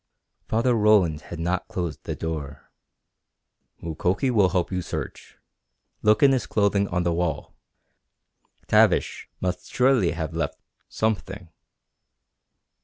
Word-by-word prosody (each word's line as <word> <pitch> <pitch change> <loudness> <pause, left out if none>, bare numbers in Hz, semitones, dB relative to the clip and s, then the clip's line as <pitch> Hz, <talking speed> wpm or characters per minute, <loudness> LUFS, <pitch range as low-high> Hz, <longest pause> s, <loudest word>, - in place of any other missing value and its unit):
Father 115 +3 +2
Roland 105 -8 +3
had 85 - -6
not 90 +2 -1
closed 85 -4 -5
the - - -3
door. 75 -4 -6 1.1
"Mukoki 90 - 0
will 105 -6 +4
help 90 +1 -1
you 90 -1 -1
search. - - -7 0.6
Look 105 +3 +3
in 140 - +7
his 125 -9 0
clothing 100 -1 +1
on 90 -1 -1
the 85 -1 +1
wall. 85 -1 -2 1.1
Tavish - - +2
must 90 -1 -3
surely 125 -8 +3
have 80 -2 -4
left - - -3 0.3
something." 100 -4 -2
90 Hz, 115 wpm, -24 LUFS, 85-105 Hz, 1.1 s, in